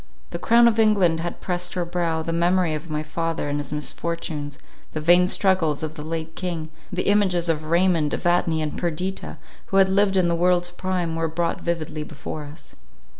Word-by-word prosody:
The -, -, -4 dB
crown 235 Hz, +1 st, +5 dB
of 230 Hz, -1 st, +2 dB
England 195 Hz, -7 st, +4 dB
had 170 Hz, +1 st, -5 dB
pressed 180 Hz, 0 st, -2 dB
her 180 Hz, -1 st, -1 dB
brow; 170 Hz, -2 st, -1 dB
the 165 Hz, -, -3 dB
memory 175 Hz, 0 st, +2 dB
of 155 Hz, +2 st, -5 dB
my 155 Hz, 0 st, -2 dB
father 165 Hz, +1 st, -2 dB
and 145 Hz, +1 st, -1 dB
his 145 Hz, -1 st, -5 dB
misfortunes, 150 Hz, -1 st, -4 dB, 0.4 s
the 155 Hz, -, -2 dB
vain 175 Hz, +3 st, +5 dB
struggles 180 Hz, -6 st, +1 dB
of 155 Hz, 0 st, -3 dB
the 155 Hz, -, -8 dB
late 160 Hz, +1 st, -5 dB
king, 170 Hz, -4 st, -4 dB, 0.2 s
the 185 Hz, 0 st, -1 dB
images 190 Hz, -4 st, +2 dB
of 155 Hz, -1 st, 0 dB
Raymond, 170 Hz, -2 st, +2 dB
Evadne, 175 Hz, -2 st, +1 dB
and 150 Hz, -, -3 dB
Perdita, 180 Hz, +3 st, -3 dB, 0.3 s
who 195 Hz, -, 0 dB
had 190 Hz, -1 st, +6 dB
lived 195 Hz, 0 st, +3 dB
in 180 Hz, -2 st, +3 dB
the 170 Hz, -, +1 dB
world's 175 Hz, +1 st, +2 dB
prime, 175 Hz, -2 st, -2 dB
were 165 Hz, 0 st, 0 dB
brought 170 Hz, +2 st, -2 dB
vividly 160 Hz, -2 st, -3 dB
before 150 Hz, 0 st, -7 dB
us. 145 Hz, +3 st, -12 dB
170 Hz, 190 wpm, -23 LUFS, 155-180 Hz, 0.4 s, had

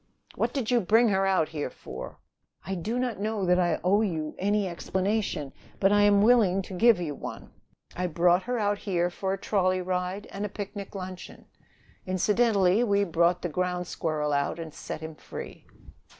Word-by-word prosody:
"What -, -, -1 dB
did 260 Hz, -5 st, -2 dB
you 240 Hz, -1 st, +4 dB
bring 225 Hz, +5 st, +4 dB
her 195 Hz, -1 st, +2 dB
out 185 Hz, -5 st, +2 dB
here 150 Hz, -4 st, -3 dB
for?" 65 Hz, -, -9 dB, 0.5 s
"I 195 Hz, -, -3 dB
do 205 Hz, +7 st, -2 dB
not 250 Hz, -5 st, -2 dB
know 210 Hz, -1 st, -1 dB
that 180 Hz, 0 st, +3 dB
I 175 Hz, -3 st, +1 dB
owe 200 Hz, +4 st, +3 dB
you 160 Hz, -7 st, -2 dB
any 205 Hz, +1 st, +1 dB
explanation, 185 Hz, -3 st, -2 dB, 0.3 s
but 195 Hz, 0 st, +4 dB
I 205 Hz, 0 st, +5 dB
am 205 Hz, 0 st, +5 dB
willing 210 Hz, -5 st, +4 dB
to 190 Hz, -, -9 dB
give 225 Hz, +1 st, +5 dB
you 160 Hz, -4 st, -3 dB
one. -, -, -8 dB, 0.4 s
I 180 Hz, 0 st, -1 dB
brought 175 Hz, +2 st, +3 dB
her 250 Hz, -, 0 dB
out 205 Hz, -2 st, 0 dB
here 175 Hz, -3 st, 0 dB
for 190 Hz, +2 st, -3 dB
a -, -, -2 dB
trolley 185 Hz, -2 st, +1 dB
ride 185 Hz, +2 st, -2 dB
and 200 Hz, -, -5 dB
a 210 Hz, -, -2 dB
picnic 200 Hz, 0 st, -7 dB
luncheon. 185 Hz, -1 st, -8 dB, 0.6 s
Incidentally 200 Hz, +1 st, +3 dB
we 200 Hz, -3 st, +2 dB
brought 170 Hz, -1 st, +2 dB
the 175 Hz, -, -1 dB
ground 180 Hz, +2 st, -1 dB
squirrel 155 Hz, -4 st, -2 dB
out 140 Hz, +2 st, 0 dB
and 165 Hz, -2 st, -7 dB
set -, -, -7 dB
him 160 Hz, 0 st, -6 dB
free." -, -, -9 dB
190 Hz, 185 wpm, -27 LUFS, 175-205 Hz, 0.6 s, I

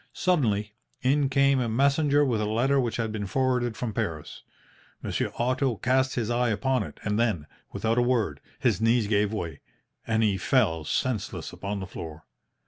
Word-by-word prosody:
Suddenly, 110 Hz, -, +1 dB, 0.3 s
in 135 Hz, +1 st, +3 dB
came 140 Hz, 0 st, +3 dB
a 120 Hz, -2 st, 0 dB
messenger 140 Hz, +4 st, +3 dB
with 115 Hz, -5 st, 0 dB
a 105 Hz, -, 0 dB
letter 130 Hz, +6 st, +2 dB
which 120 Hz, -3 st, -1 dB
had 115 Hz, -2 st, -1 dB
been 105 Hz, -2 st, -4 dB
forwarded 125 Hz, 0 st, 0 dB
from 115 Hz, -4 st, -3 dB
Paris. 80 Hz, -6 st, -4 dB, 0.6 s
Monsieur -, -, -1 dB
Otto 130 Hz, +1 st, +1 dB
cast 130 Hz, +4 st, +1 dB
his 120 Hz, -2 st, -1 dB
eye 120 Hz, 0 st, +2 dB
upon 120 Hz, +4 st, +1 dB
it, -, -, -7 dB
and 105 Hz, +1 st, 0 dB
then, 105 Hz, -11 st, +1 dB, 0.3 s
without 115 Hz, +2 st, 0 dB
a -, -, +4 dB
word, 115 Hz, -, +1 dB, 0.2 s
his -, -, +1 dB
knees 115 Hz, 0 st, +3 dB
gave 105 Hz, 0 st, +1 dB
way, 85 Hz, -9 st, -4 dB, 0.5 s
and 110 Hz, 0 st, +2 dB
he 100 Hz, -3 st, +2 dB
fell 95 Hz, -, +2 dB
senseless 125 Hz, -, -2 dB
upon 100 Hz, 0 st, -4 dB
the -, -, -4 dB
floor. 80 Hz, -4 st, -8 dB
115 Hz, 175 wpm, -27 LUFS, 105-130 Hz, 0.6 s, a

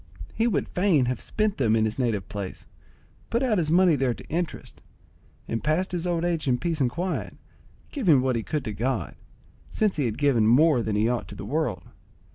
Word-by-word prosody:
He 230 Hz, -, +1 dB
would 180 Hz, -12 st, 0 dB
fain 180 Hz, -8 st, +2 dB
have 125 Hz, -1 st, -2 dB
spent 215 Hz, -2 st, -1 dB
them 115 Hz, -5 st, +2 dB
in 110 Hz, -1 st, +2 dB
his 110 Hz, +4 st, -3 dB
native 110 Hz, -7 st, -1 dB
place, 100 Hz, -2 st, -6 dB, 0.6 s
put 235 Hz, +3 st, 0 dB
out 220 Hz, -7 st, +2 dB
his 155 Hz, -3 st, 0 dB
money 175 Hz, 0 st, +5 dB
there 130 Hz, -3 st, 0 dB
to -, -, -12 dB
interest, 170 Hz, +1 st, -4 dB, 0.7 s
and 115 Hz, -, -3 dB
passed 160 Hz, +5 st, 0 dB
his 180 Hz, 0 st, -2 dB
old 170 Hz, -1 st, 0 dB
age 165 Hz, -4 st, -1 dB
in 125 Hz, -2 st, +3 dB
peace 165 Hz, 0 st, -2 dB
and 125 Hz, -, +3 dB
quiet, 175 Hz, +9 st, -4 dB, 0.5 s
giving 185 Hz, -, +3 dB
what 130 Hz, -2 st, +1 dB
he 115 Hz, -, 0 dB
could 150 Hz, +4 st, -3 dB
to 110 Hz, -, -3 dB
God, 120 Hz, +3 st, -2 dB, 0.6 s
since 210 Hz, -6 st, 0 dB
he 145 Hz, -, +1 dB
had 110 Hz, -3 st, -2 dB
given 135 Hz, -7 st, +3 dB
more 140 Hz, +2 st, +5 dB
than 110 Hz, -2 st, -2 dB
he 105 Hz, +2 st, +2 dB
ought 120 Hz, 0 st, -1 dB
to 100 Hz, -, -10 dB
the 100 Hz, -, -7 dB
world. 135 Hz, -, -2 dB
145 Hz, 210 wpm, -25 LUFS, 115-175 Hz, 0.7 s, money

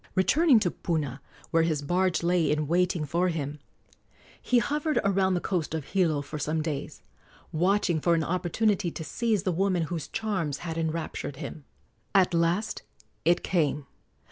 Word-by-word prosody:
Returning 265 Hz, -, +5 dB
to 175 Hz, -4 st, +1 dB
Puna, 145 Hz, -6 st, -3 dB, 0.3 s
where 165 Hz, -, +4 dB
his 155 Hz, -3 st, 0 dB
barge 180 Hz, +3 st, +1 dB
lay 175 Hz, -2 st, +2 dB
in 150 Hz, 0 st, +1 dB
waiting 175 Hz, 0 st, +1 dB
for 170 Hz, +5 st, +1 dB
him, 150 Hz, -3 st, -3 dB, 0.8 s
he 250 Hz, -, +2 dB
hovered 300 Hz, +5 st, 0 dB
around 190 Hz, -1 st, +2 dB
the -, -, +1 dB
coast 170 Hz, -4 st, -2 dB
of 155 Hz, -4 st, -4 dB
Hilo 160 Hz, -7 st, +1 dB
for 150 Hz, +1 st, -6 dB
some 155 Hz, +2 st, -1 dB
days, 150 Hz, -4 st, -5 dB, 0.5 s
watching 180 Hz, 0 st, +2 dB
for 170 Hz, +1 st, +3 dB
an 165 Hz, -, +1 dB
opportunity 185 Hz, +3 st, 0 dB
to 160 Hz, -, -6 dB
seize 220 Hz, +6 st, 0 dB
the 185 Hz, -, +1 dB
woman 180 Hz, 0 st, +1 dB
whose 160 Hz, -1 st, -4 dB
charms 185 Hz, -10 st, -2 dB
had 165 Hz, -1 st, -3 dB
enraptured 160 Hz, -3 st, -3 dB
him. 140 Hz, 0 st, -8 dB, 0.5 s
At 185 Hz, -2 st, +4 dB
last 170 Hz, +6 st, +1 dB, 0.4 s
it 175 Hz, +2 st, +3 dB
came. 150 Hz, -5 st, 0 dB
170 Hz, 160 wpm, -27 LUFS, 155-190 Hz, 0.8 s, Returning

